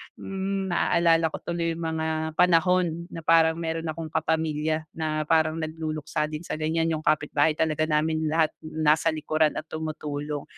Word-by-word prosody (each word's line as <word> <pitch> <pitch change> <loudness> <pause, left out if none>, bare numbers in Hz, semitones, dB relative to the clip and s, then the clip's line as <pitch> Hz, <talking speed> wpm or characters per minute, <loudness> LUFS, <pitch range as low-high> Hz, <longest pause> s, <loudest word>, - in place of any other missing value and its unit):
mm, 195 -1 -3
naalala 165 -1 +3
ko - - -4
tuloy 170 -1 -1
yung 165 - -6
mga 160 0 -2
panahon 180 -1 +3
na 165 - -6
parang 160 0 +4
meron 165 0 -2
akong 160 +1 -4
kapamilya 155 -1 0
na 155 -1 -1
parang 160 0 +2
nagluluksa 155 -1 -3
din 150 - -4
sa - - -4
ganiyan, 160 +1 0
yung 155 -1 -2
kapitbahay 150 0 +2
talaga 155 -1 0
namin 155 +1 +1
lahat 160 0 +2
nasa 155 +1 +2
likuran 155 0 +1
at 155 - -5
tumutulong. 150 -2 -4
160 Hz, 155 wpm, -26 LUFS, 155-165 Hz, -, parang